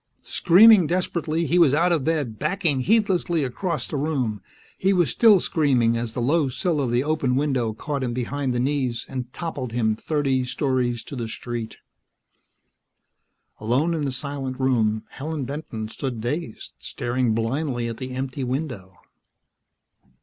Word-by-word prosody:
Screaming 190 0 +6
desperately, 170 -2 -1
he 170 +5 +2
was 145 -5 +5
out 175 +3 +3
of 160 -5 +1
bed, 145 -9 -1
backing 175 -9 0
heedlessly 180 - +2
across 150 +2 -2
the 150 - -4
room. 130 -8 -1 0.4
He 195 +1 +3
was 175 -4 +2
still 220 -5 +6
screaming 130 -9 +2
as 115 -1 -3
the 120 - -2
low 145 +2 +2
sill 155 +3 -1
of 130 - -1
the 120 +2 +1
open 145 -4 0
window 130 -5 0
caught 140 +5 -4
him 125 -2 -1
behind 130 +3 -2
the 120 - -1
knees 130 -3 -1
and 130 -2 -5
toppled 140 -8 -5
him 110 -2 +1
thirty 135 0 0
stories 125 -2 -1
to 140 - -8
the 120 -3 -3
street. 115 0 -6 1.8
Alone 130 +10 +1
in 160 - -2
the 140 -2 -1
silent 135 0 -5
room, 110 -5 +1
Helen 150 0 -4
Benton 135 -6 -5
stood 125 +1 -5
dazed, 120 +2 -4
staring 120 -2 -1
blindly 120 +1 -1
at 115 -1 -5
the 130 0 -6
empty 130 +1 -3
window. 125 - -4
135 Hz, 155 wpm, -24 LUFS, 120-155 Hz, 1.8 s, Screaming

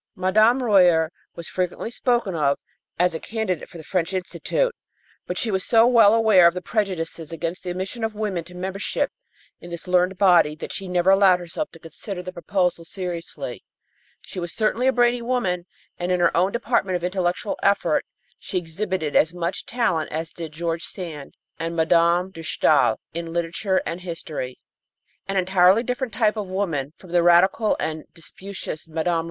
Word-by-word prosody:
Mme. 215 +6 +4
Royer 175 -7 +4 0.2
was 170 - -8
frequently 185 +5 -3
spoken 240 -5 0
of 145 -4 +1 0.4
as 180 0 +2
a 160 - -3
candidate 220 -7 -3
for - - -11
the 160 - -9
French 180 +2 -1
Institute, - - -1 0.5
but 180 - -3
she 225 - 0
was 190 -1 0
so 225 -1 +5
well 225 -3 +6
aware 215 -6 +6
of 170 - +1
the 180 - -3
prejudices 170 -7 -2
against 165 +3 -4
the 180 - -4
admission 190 +6 -4
of 220 -1 -2
women 205 -5 -2
to 180 +1 -13
membership 190 +2 -2 0.5
in 175 - -11
this 170 +1 -7
learned 180 +1 +2
body 175 -6 +5
that - - -7
she 195 - -5
never 180 +1 +3
allowed 195 -2 +5
herself 175 - -4
to 165 - -13
consider 180 +4 -6
the 185 0 -7
proposal 180 -1 -1
seriously. 175 -1 -5 0.6
She 185 - -8
was 175 -1 -4
certainly 225 +3 +1
a - - +5
brainy 245 -1 +2
woman, 195 -8 -1 0.3
and 175 +1 -1
in 180 - +2
her 175 - +3
own 185 +3 +3
department 230 -5 0
of 175 - -3
intellectual 180 +2 -1
effort 200 0 +2 0.4
she 190 - -4
exhibited 175 -2 -3
as 160 +3 +3
much 175 +1 -3
talent 225 -10 0
as 160 +1 -3
did 165 -3 -7
George 165 +1 -3
Sand 160 -7 -6 0.2
and 165 +1 -3
Mme. 170 +2 +3
de 165 - -9
Staël 160 - +3 0.2
in 165 0 -5
literature 170 +3 0
and 170 +2 -4
history. 160 -7 -5 0.7
An 195 0 -1
entirely 185 +3 +4
different 250 0 -2
type 220 -1 +2
of 205 -2 -3
woman 165 -7 -2
from 185 - -14
the 175 -1 +4
radical 180 +5 +4
and 155 -1 -3
disputatious 185 -1 -7
Mme. 165 +1 0
180 Hz, 175 wpm, -23 LUFS, 170-200 Hz, 0.7 s, well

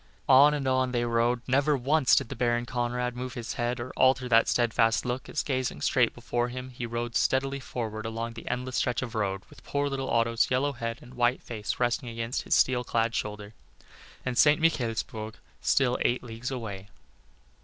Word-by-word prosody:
On 140 +3 +7
and 140 -2 -2
on 130 -1 +1
they 120 -1 +1
rode; 120 +1 +1
never 140 +3 +2
once 135 +2 +3
did 135 - 0
the 135 - -5
Baron 120 0 0
Conrad 125 0 -2
move 125 0 -5
his 120 -2 -4
head 120 +1 -2
or 120 +2 -5
alter 130 -1 +3
that 115 -1 +4
steadfast 115 -1 +2
look 125 +1 -3
as, - - -1
gazing 130 - -2
straight - - +2
before 120 0 -1
him, 130 +1 -7
he 120 -1 -5
rode 120 0 -4
steadily 135 +4 +1
forward 110 -4 -5
along 115 +1 -4
the 115 - -10
endless 125 +1 -2
stretch 120 - 0
of 120 -3 -6
road, 100 -3 -2
with - - -17
poor 145 0 -1
little 135 -1 -3
Otto's 115 0 +2
yellow 130 +3 +1
head 115 -3 -4
and 125 - -14
white 120 0 +1
face 110 -3 -4
resting 120 +1 0
against 115 +1 -3
his - - +1
steel 125 -1 +3
clad 115 -1 0
shoulder 105 0 -4 0.7
and 125 -2 -1
St. 150 +1 +6
Michaelsburg 115 -8 -1 0.3
still 125 -2 +2
eight 125 +1 +1
leagues 115 +1 -6
away. 100 -7 -6
120 Hz, 190 wpm, -28 LUFS, 115-130 Hz, 0.7 s, On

